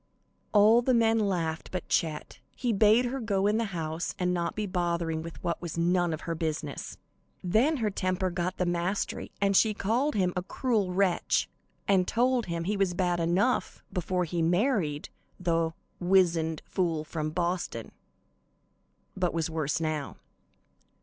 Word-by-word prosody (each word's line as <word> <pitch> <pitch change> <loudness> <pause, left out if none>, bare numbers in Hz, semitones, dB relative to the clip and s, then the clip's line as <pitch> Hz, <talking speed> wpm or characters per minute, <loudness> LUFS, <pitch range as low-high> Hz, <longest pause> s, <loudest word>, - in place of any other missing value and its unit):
All 215 +3 +6
the 255 +1 +2
men 225 -1 +3
laughed 170 -6 -1
but 180 -2 -4
Chet; 155 -2 -1 0.2
he 245 -3 0
bade 215 +4 +5
her 260 +3 -2
go 200 -5 0
in 210 +1 +3
the 230 - 0
house 165 -3 -4
and 180 0 0
not 170 -1 -1
be 215 - -2
bothering 170 -3 -1
with 165 0 -9
what 170 - -2
was 170 -2 -5
none 175 0 +2
of 155 - -4
her 165 - -3
business. 155 -3 -4 0.5
Then 230 - +3
her 220 -4 0
temper 185 -1 -1
got 175 +1 -2
the 180 - +1
mastery, 175 +3 -2
and 200 0 +2
she 215 +1 +4
called 240 +8 0
him 180 -3 +1
"a 180 - 0
cruel 210 -1 -1
wretch," 185 -1 +1 0.4
and 190 -2 +3
told 245 -1 +1
him 170 -1 -2
he 205 +5 -1
was 190 -3 +1
bad 175 -1 +1
enough 180 +9 0
before 180 0 0
he 170 +1 -2
married 175 - +1 0.3
the 165 -2 +1 0.3
"wizened 170 -4 +2
fool 165 -4 -1
from 155 0 -3
Boston," 170 -8 -2 1.2
but 180 -3 -1
was 165 0 -1
worse 155 -1 -1
now. 155 -3 -3
180 Hz, 160 wpm, -28 LUFS, 165-205 Hz, 1.2 s, All